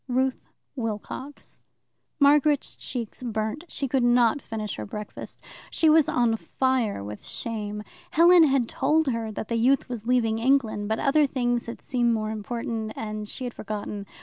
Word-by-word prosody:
Ruth 260 Hz, +1 st, -1 dB, 0.3 s
Wilcox 240 Hz, +4 st, -6 dB, 0.6 s
Margaret's 290 Hz, 0 st, +4 dB
cheeks 240 Hz, -3 st, -5 dB
burnt. 220 Hz, +5 st, -3 dB
She 275 Hz, -, -3 dB
could 265 Hz, 0 st, +1 dB
not 240 Hz, +2 st, +4 dB
finish 215 Hz, -2 st, -4 dB
her 105 Hz, -, -5 dB
breakfast. 210 Hz, -, -8 dB, 0.3 s
She 320 Hz, -2 st, +3 dB
was 315 Hz, -1 st, +5 dB
on 235 Hz, -2 st, +2 dB
fire 255 Hz, -, 0 dB
with 105 Hz, +1 st, -8 dB
shame. 210 Hz, -2 st, -4 dB, 0.3 s
Helen 340 Hz, +1 st, +7 dB
had 270 Hz, -5 st, +2 dB
told 310 Hz, +6 st, +2 dB
her 230 Hz, -2 st, -2 dB
that 215 Hz, -, -5 dB
the 230 Hz, -, -1 dB
youth 255 Hz, +4 st, +3 dB
was 235 Hz, -2 st, -6 dB
leaving 225 Hz, -3 st, +2 dB
England, 230 Hz, -5 st, +1 dB
but 220 Hz, -, +1 dB
other 290 Hz, +3 st, +3 dB
things 245 Hz, -3 st, -1 dB
had 235 Hz, -, -7 dB
seemed 240 Hz, -2 st, +1 dB
more 215 Hz, 0 st, -2 dB
important, 220 Hz, 0 st, -4 dB
and 215 Hz, -1 st, -5 dB
she -, -, -5 dB
had 245 Hz, -1 st, -4 dB
forgotten. 205 Hz, -1 st, -5 dB
235 Hz, 160 wpm, -26 LUFS, 215-265 Hz, 0.6 s, Helen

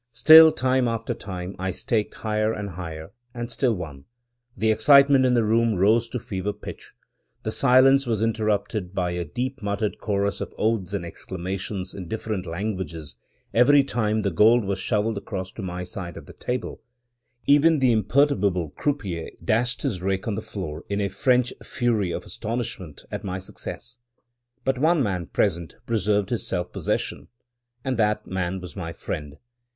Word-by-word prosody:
Still, 160 Hz, +7 st, +9 dB
time 130 Hz, -4 st, +1 dB
after 115 Hz, -1 st, -2 dB
time, 95 Hz, -1 st, -6 dB
I 95 Hz, 0 st, -1 dB
staked 105 Hz, +4 st, -1 dB
higher 110 Hz, 0 st, 0 dB
and 105 Hz, -3 st, -4 dB
higher, 80 Hz, -2 st, -7 dB, 0.2 s
and 120 Hz, 0 st, -4 dB
still 120 Hz, 0 st, +1 dB
won. 75 Hz, -7 st, -8 dB, 0.5 s
The 110 Hz, +2 st, +2 dB
excitement 140 Hz, +2 st, +6 dB
in 125 Hz, -, +3 dB
the 120 Hz, -, +3 dB
room 115 Hz, 0 st, +2 dB
rose 110 Hz, +5 st, +3 dB
to 125 Hz, -, -3 dB
fever 100 Hz, -2 st, -3 dB
pitch. 105 Hz, -, -10 dB, 0.5 s
The 110 Hz, -, -2 dB
silence 135 Hz, +2 st, +5 dB
was 115 Hz, -3 st, 0 dB
interrupted 105 Hz, -3 st, -1 dB
by 90 Hz, -2 st, 0 dB
a 90 Hz, 0 st, -2 dB
deep 130 Hz, -, -4 dB
muttered 100 Hz, +1 st, -2 dB
chorus 100 Hz, -1 st, -1 dB
of -, -, -6 dB
oaths 105 Hz, -3 st, 0 dB
and 90 Hz, -4 st, -3 dB
exclamations 95 Hz, +2 st, -4 dB
in 95 Hz, -3 st, -7 dB
different 105 Hz, -2 st, -4 dB
languages, 85 Hz, -4 st, -4 dB, 0.4 s
every 140 Hz, +4 st, +6 dB
time 110 Hz, -5 st, 0 dB
the 100 Hz, -, 0 dB
gold 110 Hz, +6 st, +5 dB
was 95 Hz, 0 st, -2 dB
shoveled 105 Hz, +1 st, 0 dB
across 95 Hz, -3 st, -5 dB
to -, -, -8 dB
my 90 Hz, -1 st, -4 dB
side 90 Hz, -2 st, -6 dB
of -, -, -10 dB
the -, -, -12 dB
table 125 Hz, +1 st, -4 dB, 0.3 s
— 120 Hz, 0 st, -45 dB
even 160 Hz, +2 st, +4 dB
the 130 Hz, -3 st, +3 dB
imperturbable 105 Hz, -, +2 dB
croupier 100 Hz, -, -3 dB, 0.2 s
dashed 120 Hz, +3 st, +1 dB
his 110 Hz, -11 st, -2 dB
rake 95 Hz, +1 st, -1 dB
on 110 Hz, -, 0 dB
the -, -, -3 dB
floor 75 Hz, +2 st, -6 dB
in 100 Hz, 0 st, -1 dB
a 100 Hz, -1 st, 0 dB
(French) 125 Hz, +5 st, +2 dB
fury 115 Hz, -6 st, 0 dB
of -, -, -4 dB
astonishment 105 Hz, -, -5 dB
at -, -, -5 dB
my 95 Hz, -1 st, -3 dB
success. 120 Hz, +5 st, -8 dB, 0.7 s
But 130 Hz, -1 st, +1 dB
one 160 Hz, 0 st, +3 dB
man 90 Hz, -6 st, -2 dB
present 85 Hz, -4 st, -1 dB
preserved 105 Hz, -2 st, 0 dB
his 120 Hz, -, -1 dB
self 90 Hz, -1 st, -2 dB
possession, -, -, -3 dB, 0.6 s
and 130 Hz, -2 st, -1 dB
that 105 Hz, -2 st, +1 dB
man 95 Hz, 0 st, -2 dB
was 90 Hz, -4 st, -9 dB
my 85 Hz, -3 st, -5 dB
friend. 75 Hz, -2 st, -6 dB
105 Hz, 170 wpm, -24 LUFS, 95-120 Hz, 0.7 s, Still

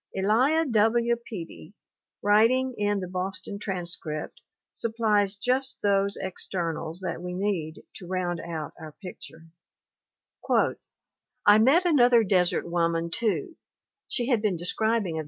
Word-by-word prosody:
Elia 255 Hz, +12 st, +3 dB
W. 235 Hz, 0 st, +2 dB, 0.2 s
Peattie, 180 Hz, -1 st, -8 dB, 0.5 s
writing 230 Hz, +5 st, +4 dB
in 205 Hz, -1 st, 0 dB
the 185 Hz, -, -4 dB
Boston 190 Hz, +2 st, -4 dB
Transcript, 170 Hz, -6 st, -4 dB, 0.3 s
supplies 215 Hz, -3 st, +1 dB
just 255 Hz, +6 st, -1 dB
those 200 Hz, 0 st, +2 dB
externals 170 Hz, -2 st, -3 dB
that 185 Hz, -, -4 dB
we 180 Hz, 0 st, -5 dB
need 180 Hz, -5 st, -2 dB
to 180 Hz, -, -10 dB
round 180 Hz, -2 st, -2 dB
out 160 Hz, -3 st, -5 dB
our 155 Hz, -2 st, -9 dB
picture: 165 Hz, -2 st, -11 dB, 2.0 s
"I 205 Hz, +1 st, +7 dB
met 280 Hz, +11 st, +4 dB
another 245 Hz, -8 st, +5 dB
desert 180 Hz, -4 st, +1 dB
woman, 170 Hz, -1 st, 0 dB
too 215 Hz, -, -1 dB, 0.5 s
[she 240 Hz, -2 st, -2 dB
had 240 Hz, -5 st, +2 dB
been 205 Hz, -5 st, 0 dB
describing 205 Hz, 0 st, -1 dB
r. -, -, -1 dB
200 Hz, 120 wpm, -26 LUFS, 175-230 Hz, 2.0 s, I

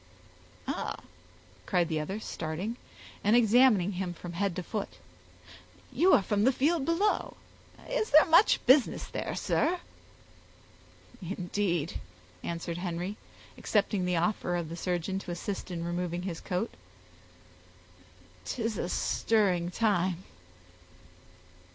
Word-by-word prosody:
"Ah!" -, -, -2 dB, 0.7 s
cried 175 Hz, -2 st, +2 dB
the 160 Hz, -2 st, -1 dB
other, 190 Hz, +8 st, -3 dB
starting, 175 Hz, +4 st, -4 dB, 0.5 s
and 210 Hz, +3 st, +4 dB
examining 230 Hz, -4 st, +5 dB
him 180 Hz, -2 st, -3 dB
from 175 Hz, +1 st, -8 dB
head 190 Hz, 0 st, -1 dB
to 185 Hz, -, -3 dB
foot, 205 Hz, +3 st, -5 dB, 1.0 s
"you 370 Hz, +3 st, +4 dB
are 195 Hz, -, +5 dB
from 205 Hz, +1 st, +1 dB
the 260 Hz, -, +5 dB
field 290 Hz, +3 st, +1 dB
below. 365 Hz, +6 st, 0 dB, 0.5 s
Is -, -, -1 dB
there 305 Hz, +2 st, +7 dB
much 335 Hz, +6 st, +5 dB
business 260 Hz, +1 st, +4 dB
there, -, -, -4 dB
sir?" 350 Hz, +3 st, +1 dB, 1.4 s
"Indeed," 175 Hz, -2 st, -2 dB, 0.4 s
answered 170 Hz, 0 st, -4 dB
Henry, 180 Hz, +2 st, -3 dB, 0.4 s
accepting 205 Hz, -3 st, +1 dB
the 180 Hz, 0 st, +1 dB
offer 175 Hz, 0 st, 0 dB
of 170 Hz, -3 st, -3 dB
the 165 Hz, -, -5 dB
surgeon 180 Hz, +2 st, -2 dB
to 195 Hz, -, -10 dB
assist 185 Hz, +4 st, -4 dB
in 170 Hz, -2 st, -4 dB
removing 175 Hz, 0 st, -2 dB
his 175 Hz, -3 st, -4 dB
coat, 190 Hz, +4 st, -2 dB, 1.7 s
"'tis 225 Hz, -4 st, -2 dB
a 175 Hz, -, -2 dB
stirring 185 Hz, -7 st, +1 dB
time." 185 Hz, -3 st, +1 dB
190 Hz, 120 wpm, -29 LUFS, 175-225 Hz, 1.7 s, there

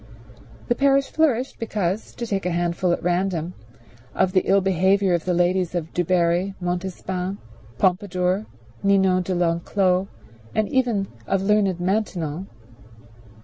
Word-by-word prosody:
The -, -, +3 dB
parish 275 Hz, +1 st, +2 dB
flourished 270 Hz, -5 st, +1 dB
because, 210 Hz, -3 st, -2 dB
to 240 Hz, -, -4 dB
take 195 Hz, -4 st, -2 dB
a -, -, +1 dB
handful 175 Hz, +1 st, 0 dB
at -, -, -1 dB
random, 180 Hz, -1 st, 0 dB, 0.6 s
of 190 Hz, -1 st, +2 dB
the 185 Hz, -, +4 dB
ill 195 Hz, +1 st, +5 dB
behavior 190 Hz, +1 st, +2 dB
of 170 Hz, -2 st, 0 dB
the 180 Hz, -, +1 dB
ladies 180 Hz, 0 st, +1 dB, 0.2 s
Du 175 Hz, -, +1 dB
Barri, 180 Hz, +2 st, +1 dB
Montespan, 180 Hz, +1 st, -3 dB, 0.4 s
Pompadour, 185 Hz, -, +1 dB, 0.3 s
Ninon 190 Hz, -2 st, +3 dB
de 185 Hz, +1 st, -2 dB
l'Enclos, 180 Hz, +2 st, +1 dB, 0.5 s
and 215 Hz, -1 st, +2 dB
even 235 Hz, -7 st, +1 dB, 0.2 s
of 195 Hz, -1 st, 0 dB
learned 200 Hz, -3 st, +2 dB
Maintenon. 180 Hz, -3 st, -2 dB
185 Hz, 130 wpm, -23 LUFS, 175-200 Hz, 0.6 s, ill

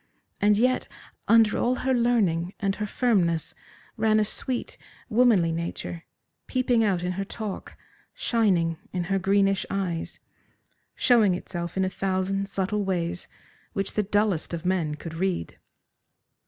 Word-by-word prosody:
And 205 Hz, 0 st, +4 dB
yet 255 Hz, +3 st, +2 dB, 0.4 s
under 225 Hz, -2 st, +5 dB
all 250 Hz, +1 st, +2 dB
her 260 Hz, +1 st, 0 dB
learning 205 Hz, -8 st, +1 dB
and 195 Hz, -1 st, 0 dB
her 210 Hz, -, -2 dB
firmness 180 Hz, -, +1 dB, 0.4 s
ran 215 Hz, -1 st, +3 dB
a 215 Hz, -, +2 dB
sweet, 250 Hz, +4 st, -3 dB, 0.3 s
womanly 220 Hz, -8 st, +4 dB
nature, 170 Hz, 0 st, -4 dB, 0.4 s
peeping 250 Hz, -3 st, +2 dB
out 190 Hz, -5 st, +1 dB
in 180 Hz, -, -1 dB
her 195 Hz, +2 st, -2 dB
talk, 205 Hz, 0 st, -6 dB, 0.4 s
shining 180 Hz, -8 st, +1 dB
in 180 Hz, -1 st, -2 dB
her 195 Hz, -, +2 dB
greenish 195 Hz, 0 st, +2 dB
eyes, 180 Hz, -4 st, -3 dB, 0.8 s
showing 220 Hz, -7 st, +4 dB
itself 175 Hz, -1 st, -5 dB
in 190 Hz, -, +2 dB
a -, -, 0 dB
thousand 195 Hz, +1 st, -1 dB
subtle 200 Hz, +1 st, -1 dB
ways 180 Hz, -2 st, -2 dB, 0.5 s
which 195 Hz, -1 st, -2 dB
the 210 Hz, -, +2 dB
dullest 205 Hz, -5 st, 0 dB
of 170 Hz, +1 st, -8 dB
men 175 Hz, -5 st, 0 dB
could 165 Hz, +2 st, -8 dB
read. 175 Hz, -, -2 dB
195 Hz, 140 wpm, -26 LUFS, 175-215 Hz, 0.8 s, under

